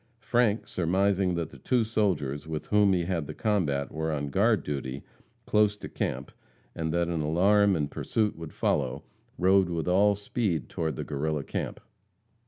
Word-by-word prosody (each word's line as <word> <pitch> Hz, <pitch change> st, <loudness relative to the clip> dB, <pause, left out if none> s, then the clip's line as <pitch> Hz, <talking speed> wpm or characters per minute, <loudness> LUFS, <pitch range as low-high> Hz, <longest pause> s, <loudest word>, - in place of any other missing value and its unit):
Frank, 120 Hz, -3 st, +1 dB
surmising 95 Hz, +1 st, +1 dB
that 85 Hz, -2 st, -3 dB
the -, -, -13 dB
two 125 Hz, -3 st, +1 dB
soldiers 90 Hz, -, -1 dB
with 80 Hz, -1 st, -4 dB
whom 105 Hz, -1 st, +4 dB
he 90 Hz, -2 st, +2 dB
had 85 Hz, -5 st, -2 dB
the -, -, -7 dB
combat 80 Hz, -11 st, 0 dB
were 80 Hz, 0 st, -2 dB
on 70 Hz, -2 st, -3 dB
guard 110 Hz, +4 st, +3 dB
duty 70 Hz, -2 st, -4 dB, 0.4 s
close 105 Hz, -1 st, +3 dB
to -, -, -7 dB
camp, -, -, -3 dB, 0.4 s
and 80 Hz, -1 st, -2 dB
that 85 Hz, +1 st, +1 dB
an 85 Hz, -2 st, -1 dB
alarm 100 Hz, +6 st, +3 dB
and 75 Hz, -3 st, -2 dB
pursuit 110 Hz, -2 st, -1 dB
would 80 Hz, -1 st, -8 dB
follow, -, -, -1 dB, 0.3 s
rode 95 Hz, 0 st, +4 dB
with 85 Hz, -1 st, -2 dB
all 100 Hz, +3 st, +4 dB
speed 100 Hz, -, -2 dB
toward 80 Hz, -3 st, -2 dB
the -, -, -4 dB
Guerrilla 75 Hz, 0 st, -2 dB
camp. -, -, -4 dB
90 Hz, 170 wpm, -28 LUFS, 80-105 Hz, 0.4 s, whom